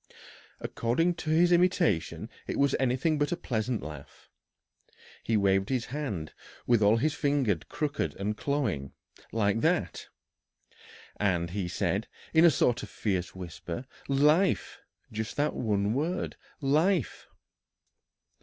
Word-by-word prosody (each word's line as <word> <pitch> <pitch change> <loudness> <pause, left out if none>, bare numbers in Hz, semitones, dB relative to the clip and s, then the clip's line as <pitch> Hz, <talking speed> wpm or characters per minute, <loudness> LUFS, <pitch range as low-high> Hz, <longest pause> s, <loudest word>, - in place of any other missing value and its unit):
According 165 +10 0
to 160 - -5
his 170 +3 +4
imitation 175 - +2 0.2
it - - -3
was 140 -1 +3
anything 135 +4 +1
but 145 - +1
a 175 - 0
pleasant 120 -6 -2
laugh. 75 -2 -10 0.9
"He 115 - +1
waved 95 -1 +2
his 130 -3 0
hand, 115 - -4 0.3
with 120 -3 +3
all 105 +2 +5
his 150 +6 +1
fingers 140 - +1
crooked 150 -1 -2
and 105 +2 -2
clawing 110 - -2 0.4
like 105 -1 +1
that. 160 - 0 1.1
And 85 -4 0
he 95 -1 -2
said, - - -1 0.3
in 160 - +6
a - - +9
sort 120 -4 +2
of - - -8
fierce 95 -5 -2
whisper, 90 +4 -6 0.2
'Life!' 150 +7 +2 0.3
Just 110 0 -4
that 145 +1 +1
one 105 -2 0
word, 155 +8 -2 0.3
'Life!'" 155 - +1
120 Hz, 125 wpm, -29 LUFS, 100-150 Hz, 1.1 s, a